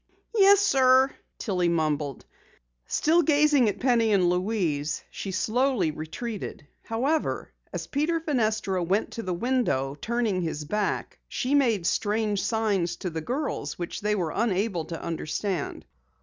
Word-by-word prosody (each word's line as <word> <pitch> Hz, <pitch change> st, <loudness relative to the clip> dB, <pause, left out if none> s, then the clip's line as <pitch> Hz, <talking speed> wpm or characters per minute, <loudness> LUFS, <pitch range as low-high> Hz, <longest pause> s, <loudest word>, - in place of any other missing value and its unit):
"Yes, 400 Hz, -2 st, +6 dB
sir," 265 Hz, -6 st, +5 dB, 0.3 s
Tillie 180 Hz, -5 st, 0 dB
mumbled. 150 Hz, -4 st, -1 dB, 0.6 s
Still 330 Hz, +3 st, +3 dB
gazing 295 Hz, -5 st, +4 dB
at 200 Hz, -, -4 dB
Penny 235 Hz, -3 st, +3 dB
and 185 Hz, -3 st, +4 dB
Louise, 180 Hz, -6 st, -1 dB
she 195 Hz, -, -5 dB
slowly 220 Hz, -, +1 dB
retreated. 165 Hz, +4 st, -6 dB, 0.2 s
However, 270 Hz, +8 st, -1 dB, 0.2 s
as -, -, -4 dB
Peter 310 Hz, +4 st, 0 dB
Fenestra 220 Hz, -, 0 dB
went 195 Hz, +6 st, 0 dB
to 230 Hz, -, -5 dB
the 185 Hz, -, -4 dB
window, 230 Hz, -, 0 dB
turning 220 Hz, +3 st, -1 dB
his 155 Hz, -3 st, -3 dB
back, 210 Hz, +6 st, -2 dB
she 260 Hz, +2 st, -2 dB
made 235 Hz, -11 st, +3 dB
strange 210 Hz, +1 st, 0 dB
signs 200 Hz, -7 st, 0 dB
to 180 Hz, 0 st, -5 dB
the 160 Hz, 0 st, -4 dB
girls 270 Hz, -, -3 dB
which 175 Hz, -1 st, -5 dB
they 210 Hz, 0 st, +1 dB
were 175 Hz, -6 st, -1 dB
unable 200 Hz, -6 st, 0 dB
to 165 Hz, 0 st, -6 dB
understand. 170 Hz, +1 st, -3 dB
210 Hz, 135 wpm, -26 LUFS, 175-255 Hz, 0.6 s, Yes